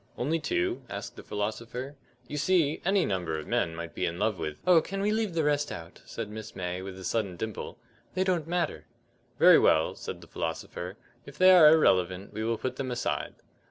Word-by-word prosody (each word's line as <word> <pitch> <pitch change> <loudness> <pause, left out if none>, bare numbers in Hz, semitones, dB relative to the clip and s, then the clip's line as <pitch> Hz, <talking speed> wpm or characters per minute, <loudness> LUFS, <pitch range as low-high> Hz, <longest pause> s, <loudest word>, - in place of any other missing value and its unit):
"Only 155 +7 0
two?" 360 - -1
asked - - -6
the - - -9
philosopher. 115 +6 -4 0.3
"You 150 - -5
see, 155 -1 +2
any 190 0 +3
number 90 -5 -2
of 75 - -6
men 80 -1 0
_might 85 0 -5
_ - - -30
be - - -1
in 85 - -4
love 105 -1 0
with 80 -2 -4
" - - -29
"Oh, 180 -2 +6
we - - +6
can 195 +3 -4
leave 210 -3 0
the 160 - +2
rest 145 0 +1
out," 85 +1 -9
said 115 - -5
Miss 110 +1 -8
May, 90 0 -3
with 95 0 -7
a 95 - -9
sudden 100 -3 -1
dimple; 110 +2 -5 0.4
"they 185 - +2
don't 180 -5 0
matter." 175 +1 -2 0.5
"Very - - +8
well," 80 0 +3
said - - -7
the - - -12
philosopher, 85 +4 -5 0.3
"if 140 - -11
they 185 0 +7
are 175 -4 +9
irrelevant 95 - +2
we 110 +1 -3
will 115 0 0
put 130 +2 -4
them 135 -2 -3
aside." 120 - -2
115 Hz, 215 wpm, -28 LUFS, -, 0.5 s, are